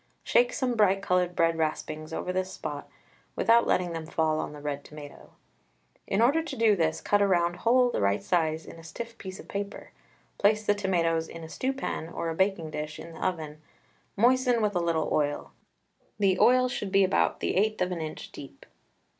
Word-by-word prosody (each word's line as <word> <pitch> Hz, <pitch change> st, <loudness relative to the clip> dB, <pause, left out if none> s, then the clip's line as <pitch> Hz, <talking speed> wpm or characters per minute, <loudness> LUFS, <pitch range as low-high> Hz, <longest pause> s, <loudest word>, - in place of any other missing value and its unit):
Shake -, -, +3 dB
some 260 Hz, -, -1 dB
bright 200 Hz, -3 st, +3 dB
coloured 180 Hz, -1 st, +1 dB
bread 165 Hz, -1 st, +2 dB
raspings 155 Hz, 0 st, -3 dB
over 180 Hz, +2 st, -3 dB
this 185 Hz, 0 st, -2 dB
spot -, -, -6 dB, 0.5 s
without 235 Hz, +1 st, +4 dB
letting 180 Hz, -2 st, +1 dB
them 160 Hz, -1 st, -5 dB
fall 160 Hz, -1 st, 0 dB
on -, -, -4 dB
the 150 Hz, -, -10 dB
red 145 Hz, -1 st, -4 dB
tomato. 150 Hz, -1 st, -12 dB, 0.7 s
In 200 Hz, +4 st, +2 dB
order 285 Hz, +7 st, +4 dB
to 320 Hz, -, -6 dB
do 225 Hz, -2 st, +4 dB
this, 160 Hz, -3 st, 0 dB
cut 205 Hz, 0 st, +2 dB
a 200 Hz, -, +4 dB
round 175 Hz, -2 st, +1 dB
hole 245 Hz, +4 st, +3 dB
the -, -, -1 dB
right 100 Hz, +1 st, +1 dB
size 160 Hz, -2 st, 0 dB
in 165 Hz, -, -11 dB
a -, -, -13 dB
stiff 230 Hz, +9 st, -7 dB
piece 190 Hz, 0 st, -8 dB
of -, -, -11 dB
paper. 200 Hz, +1 st, -6 dB, 0.5 s
Place 215 Hz, +1 st, +3 dB
the 205 Hz, -, +4 dB
tomatoes 170 Hz, -5 st, 0 dB
in 165 Hz, -, -9 dB
a 160 Hz, -, -9 dB
stew 260 Hz, +10 st, -2 dB
pan 265 Hz, -11 st, -4 dB
or 170 Hz, -, -3 dB
a -, -, -2 dB
baking 190 Hz, -4 st, 0 dB
dish 150 Hz, 0 st, -5 dB
in 165 Hz, -, -9 dB
the 160 Hz, -, -8 dB
oven, 155 Hz, -4 st, -3 dB, 0.6 s
moistened 245 Hz, +1 st, +3 dB
with 210 Hz, -1 st, +1 dB
a -, -, +2 dB
little 165 Hz, -2 st, 0 dB
oil. 145 Hz, -1 st, -1 dB, 0.7 s
The 195 Hz, -3 st, +2 dB
oil 255 Hz, +1 st, +5 dB
should 205 Hz, -5 st, -4 dB
be 195 Hz, 0 st, +5 dB
about 185 Hz, -, +1 dB
the -, -, -1 dB
eighth 215 Hz, +3 st, +1 dB
of 180 Hz, -, 0 dB
an 170 Hz, -2 st, -3 dB
inch 155 Hz, -1 st, -7 dB
deep. -, -, -11 dB
180 Hz, 205 wpm, -28 LUFS, 160-215 Hz, 0.7 s, oil